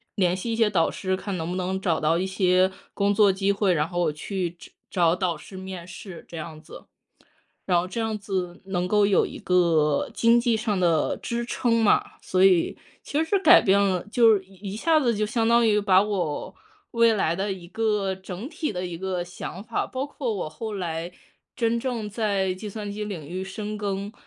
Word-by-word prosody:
联 180 -3 +2
系 230 +5 -3
一 - - 0
些 225 -2 +3
导 170 -5 +2
师， 190 0 -2
看 200 -1 -4
能 165 0 -4
不 180 - -3
能 185 +1 -2
找 170 -5 +1
到 160 +2 +2
一 185 - 0
些 185 0 +3 0.2
工 200 0 +1
作 200 -1 +5
机 195 +1 +1
会， 200 -2 +2
然 150 -1 +1
后 175 - -3
我 165 -3 +2
去 180 +2 -3
找 - - -12 0.2
找 170 -3 +3
导 180 -3 -1
师 190 +5 -11
面 185 -2 -7
试 180 0 -10
这 170 - -9
样 155 -1 -7
子。 - - -13 0.8
然 180 -2 +2
后 180 - -5
这 210 - -6
样 220 -1 -1
子 185 -3 -4
能 180 -2 -1
够 205 +1 +3
有 200 - +3
一 - - -9
个 165 -5 +2
经 230 +1 +4
济 235 -1 +2
上 215 -3 -1
的 165 -4 +2
支 235 0 -3
撑 230 -2 +1
嘛， 210 - +4 0.2
所 185 0 +2
以 185 -3 +4 0.3
其 305 +3 -1
实 395 +4 +1
改 355 -1 +8
变 200 +1 +4
了 185 -3 +1
就 230 -3 +6
是 190 - -6
一 195 +1 -8
下 315 +7 +3
子 235 -6 +1
就 215 - +1
相 225 +1 0
当 235 0 +5
于 210 -1 +3
把 190 -2 +5
我 185 -8 -2 0.4
未 230 -1 +4
来 170 -5 +1
的 195 +2 -2
一 180 -2 -9
个 210 -1 0
整 190 +5 -7
体 310 -3 -3
的 180 -1 -3
一 175 -1 -6
个 185 0 -3
想 180 +1 -7
法 230 0 -1
包 260 +2 -4
括 265 -5 -3
我 185 -7 -3
后 215 +8 -6
来 170 -3 -3 0.5
真 230 0 +1
正 235 -5 -3
在 200 -3 0
计 210 +3 -7
算 205 0 -6
机 210 +1 -4
领 175 -9 -6
域 185 +3 -4
深 210 +2 -5
耕， 200 0 -3
195 Hz, 230 characters per minute, -25 LUFS, 180-215 Hz, 0.8 s, 改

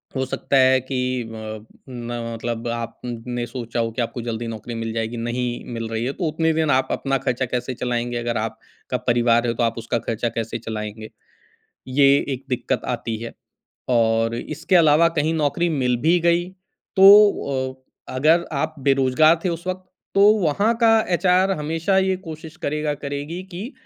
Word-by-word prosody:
हो 130 0 0
सकता 135 +1 -1
है 130 0 +5
कि 130 0 -4 0.3
अ, 110 -1 -8 0.2
म 120 -1 -5
मतलब 115 +1 -4
आपने 120 +1 -4
सोचा 120 -1 -5
हो 115 0 0
कि 120 - -3
आपको 120 +1 -3
जल्दी 115 0 -4
नौकरी 115 +1 -6
मिल 115 0 -3
जाएगी, 115 +1 -3
नहीं 120 +1 -3
मिल 115 -1 -4
रही 115 +1 -2
है, 135 - -1
तो 185 - -5
उतने 160 +1 +1
दिन 160 -1 +1
आप 130 0 +2
अपना 135 0 0
खर्चा 125 +1 0
कैसे 125 +1 -3
चलाएँगे? 120 0 -2
अगर 120 0 -2
आपका 110 +3 -5
परिवार 120 0 +3
है, 115 - +1
तो 120 - -1
आप 115 0 0
उसका 115 +1 -2
खर्चा 115 +1 -1
कैसे 115 +1 -3
चलाएँगे? 110 -1 -6 0.8
ये 140 +2 +4 0.3
एक 130 +2 -10
दिक्कत 125 0 -2
आती 115 -1 -4
है 115 - -6 0.6
और 115 -1 +2
इसके 160 +8 0
अलावा 160 0 +5
कहीं 155 +2 +1
नौकरी 160 +3 +1
मिल 125 -5 +1
भी 175 +2 +5
गई, 170 +1 +2 0.5
तो 190 -10 +6 0.3
अ, - - -7
अगर 160 +6 +3
आप 155 +3 -1
बेरोज़गार 135 +4 +4
थे - - +2
उस 170 +1 -4
वक़्त, 185 0 -3 0.3
तो 200 - +5 0.2
वहाँ 200 +8 +2
का 225 -1 +6 0.2
एचआर 185 +2 +3
हमेशा 165 +5 0
ये 190 -1 +2
कोशिश 160 +1 -9
करेगा, 150 -1 -2
करेगी 145 +5 -5
कि 220 +10 -6
130 Hz, 175 wpm, -22 LUFS, 115-160 Hz, 0.8 s, तो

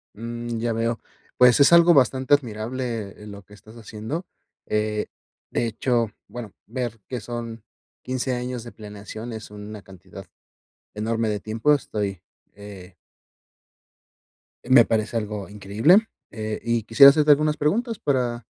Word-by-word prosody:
Mm, 120 +1 -5
ya 115 0 -1
veo. 115 +1 -1 0.4
Pues, 125 +1 +6
es 140 - +6
algo 170 0 +7
bastante 130 0 +3
admirable, 115 -4 -2
eh, - - -10
lo 100 -1 -10
que 105 - -19
estás 110 +2 -16
haciendo. 115 - -6 0.4
Eh, 105 0 -1 0.4
de 120 - 0
hecho 115 -1 0 0.2
bueno, 115 -5 -8
ver 120 -2 -4
que 125 -2 -4
son 115 -1 -7 0.4
15 130 0 -2
años 125 -1 -4
de 120 - -10
planeación, 105 +2 -9
es 110 -1 -8
una 105 0 -9
cantidad 95 -3 -13 0.7
enorme 110 +1 -1
de 105 - -2
tiempo. 110 +9 +1
Estoy, 100 -9 -3 0.3
eh 100 -3 -12 1.7
Me 125 -2 +7
parece 110 0 -1
algo 105 -2 -4
increíble. 105 - +3 0.3
Eh, 110 -1 -4
y 115 -2 0
quisiera 115 +5 +8
hacerte 150 0 +3
algunas 150 +1 +3
preguntas, 225 - 0
para 125 -5 -1
115 Hz, 140 wpm, -23 LUFS, 105-125 Hz, 1.7 s, quisiera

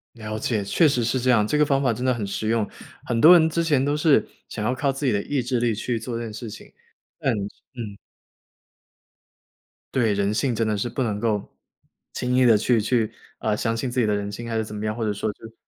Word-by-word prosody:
了 110 -1 -5
解， 110 -2 -1
确 155 - +3
实 125 -4 +1
是 120 +3 0
这 125 +1 0
样， 110 -4 +4
这 150 - +1
个 150 - +4
方 140 -1 +1
法 125 -4 +2
真 125 - -5
的 130 - +3
很 115 -4 -3
实 100 +2 -3
用， 115 -2 +1 0.4
很 115 - -1
多 165 +3 +10
人 160 -1 +3
之 170 +1 0
前 145 -5 +2
都 145 +1 +1
是 150 -1 +3 0.2
想 105 - -4
要 125 - +1
靠 135 +2 0
自 135 +2 -4
己 130 - +3
的 100 - +1
意 145 -2 -1
志 125 0 -1
力， 115 -2 +1
去 115 +2 -2
做 115 +1 -4
这 120 - -4
件 110 -2 -6
事 115 +1 -7
情， - - -11 0.5
但 135 - +1 0.4
嗯。 105 -5 -6 2.0
对， 115 -5 +2
人 100 +1 0
性 125 +3 0
真 115 0 0
的 105 -1 0
是 110 +4 -2
不 130 - -3
能 105 -5 -1
够 105 -3 -2 0.6
轻 125 0 -1
易 130 0 +5
地 115 -3 +6
去 115 +1 +2
去 115 0 +1 0.3
啊， 110 -1 0
相 115 +1 -1
信 120 +3 -2
自 125 +1 -2
己 120 - +3
的 105 - +1
人 100 0 -3
性 115 +3 -7
还 115 - -1
是 110 - -1
怎 105 - -8
么 105 +1 -4
样， 105 0 -1
或 115 - -3
者 105 - 0
说 105 +2 -2
是 115 +1 -13
115 Hz, 270 characters per minute, -24 LUFS, 110-130 Hz, 2.0 s, 多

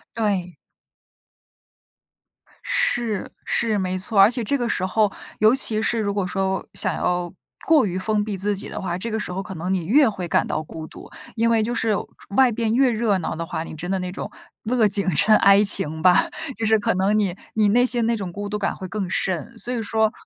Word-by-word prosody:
对。 195 -6 -1 2.1
是 225 -5 +1
是， 220 -3 +1
没 185 -1 -2
错。 195 +2 0
而 195 +2 +8
且 245 0 -2
这 280 +7 0
个 240 -3 -2
时 185 - -1
候， 210 +2 +1 0.3
尤 215 +3 +5
其 220 -5 +4
是 230 +1 0
如 200 -2 -1
果 200 -2 -1
说 190 +1 -2
想 - - 0
要 175 -1 -2 0.3
过 310 -7 +5
于 185 -1 -3
封 210 +2 0
闭 205 -2 -4
自 205 +2 +2
己 190 - -6
的 - - -6
话， 175 -2 -3
这 225 +5 -5
个 220 - -2
时 210 - -4
候 190 +2 -3
可 190 0 -8
能 180 +4 -3
你 175 -4 -2
越 265 - +4
会 180 -4 -5
感 - - +1
到 155 - -2
孤 160 +1 -9
独。 - - -13 0.3
因 230 +1 +1
为 225 -2 +2
就 240 +2 -2
是 225 -1 +1 0.4
外 260 -2 +5
边 225 0 -1
越 260 -1 +3
热 215 -3 +1
闹 165 - -4
的 165 +1 -4
话， 160 -1 -4
你 160 - -9
真 170 +3 -7
的 190 0 0
那 180 0 -4
种 190 - -7 0.3
乐 230 -1 +2
景 195 -4 +2
生 215 +7 +5
哀 200 +1 +5
情 160 -5 0
吧， 180 +1 +4 0.3
就 225 - -3
是 220 0 +4
可 205 - 0
能 195 +3 +1
你 195 -4 0 0.2
你 215 -1 +2
内 245 +4 +4
心 240 -2 +1
那 235 - +1
种 190 -4 -5
孤 205 +2 -6
独 210 - -2
感 - - -2
会 185 - -7
更 195 -2 -4
甚。 185 +5 -2
所 245 +2 -2
以 230 - -2
说， 220 0 +1
205 Hz, 240 characters per minute, -22 LUFS, 185-225 Hz, 2.1 s, 而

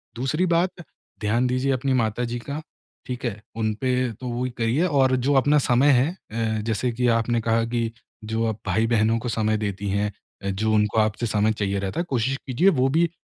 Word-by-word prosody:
दूसरी 135 +9 0
बात 175 +2 +2 0.5
ध्यान 115 +4 +1
दीजिए 130 +2 0
अपनी 130 +1 0
माताजी 120 0 0
का, 140 +5 -5 0.5
ठीक 125 0 -4
है? 105 -3 -3
उन 110 -1 0
पे 125 -2 +1
तो 125 +4 -8
वही 125 +2 -2
करिए 120 +9 +1
और 135 -5 +3
जो 135 +3 +1
अपना 145 +3 +4
समय 125 +4 +4
है 130 +1 +4
अ, 110 - -3
जैसे 115 +3 -1
कि 125 +1 0
आपने 115 0 0
कहा 115 +1 +1
कि 115 -1 -1 0.3
जो 110 +1 -1
आप 110 -1 -3
भाई-बहनों 115 0 +2
को 120 +1 -4
समय 110 -1 +1
देती 100 -1 -3
हैं 100 +1 0 0.3
अ, 100 - -1
जो 110 +3 0
उनको 105 +1 +2
आपसे 110 +2 +1
समय 110 0 +2
चाहिए 100 -2 -1
रहता 95 - -3
है - - +1
कोशिश 130 +1 0
कीजिए 155 +10 +4
वो 135 - +3
भी 170 -1 +3
115 Hz, 200 wpm, -24 LUFS, 110-130 Hz, 0.5 s, अपना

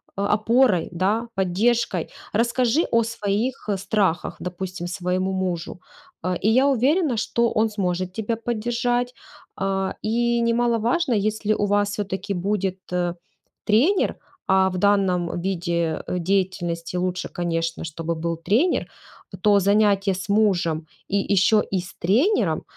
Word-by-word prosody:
опорой, 210 0 +2
да, 200 +7 0
поддержкой. 195 0 +1 0.2
Расскажи 235 +6 +2
о 230 0 +4
своих 220 +1 -2
страхах, 190 -3 0
допустим, 180 0 -5
своему 185 +1 -1
мужу, 180 -2 -3 0.4
э, 185 +1 0
и 215 - +3
я 255 +5 +4
уверена, 275 +2 +2
что 235 +1 +1
он 220 +1 +3
сможет 185 -3 -2
тебя 220 +3 -2
поддержать, 240 +2 -1 0.5
э, 195 0 0
и 235 +2 +1
немаловажно, 235 +5 +1
если 215 0 0
у 205 - 0
вас 205 0 +2
всё-таки 200 -1 -3
будет 190 0 -1 0.9
тренер, 280 - +3 0.3
а, 190 0 +4
в 185 - -4
данном 185 -3 +1
виде 170 -3 -1
деятельности 180 -2 -1
лучше, 180 0 -2
конечно, 165 -1 -2
чтобы 165 +1 -3
был 165 0 -3
тренер, 225 - +1 0.5
то 205 +1 +5
занятия 200 0 +3
с 190 +1 -6
мужем 180 -7 +2 0.2
и - - -1
еще 200 +2 +3
и 195 - +1
с 175 -1 -9
тренером, 250 - +2
200 Hz, 125 wpm, -23 LUFS, 180-230 Hz, 0.9 s, то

